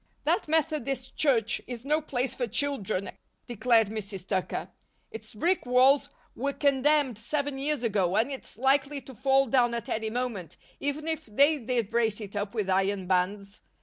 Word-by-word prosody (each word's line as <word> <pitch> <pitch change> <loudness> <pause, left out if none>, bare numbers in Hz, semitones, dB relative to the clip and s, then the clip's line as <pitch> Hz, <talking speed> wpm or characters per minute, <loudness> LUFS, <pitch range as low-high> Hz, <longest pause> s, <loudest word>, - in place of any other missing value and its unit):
"That - - +1
Methodist 290 -5 -1
Church 230 -7 +2
is 245 0 -7
no 305 +2 +2
place 260 -3 -2
for 245 - -2
children," 220 -6 -1 0.3
declared 230 -2 +2
Mrs. 200 -3 -5
Tucker. 190 -2 -2 0.4
"Its 220 -1 -10
brick 350 - +1
walls 260 +3 +4 0.3
were 280 +3 -2
condemned 280 -3 +2
seven 285 +3 -2
years 290 -1 -1
ago 195 -5 +1
and 230 +6 +2
it's 270 - -8
likely 275 +3 +2
to 265 +1 -12
fall 270 +3 +3
down 240 -1 +2
at 235 - -5
any 220 0 -1
moment, 230 -7 -4 0.2
even 285 +2 -2
if 320 -5 -3
they 285 +8 +4
did 235 -3 -1
brace 225 -2 +1
it 205 -2 -8
up 205 +2 -3
with 210 -4 -1
iron 190 0 +1
bands. 195 +2 -1
245 Hz, 165 wpm, -28 LUFS, 210-280 Hz, 0.4 s, walls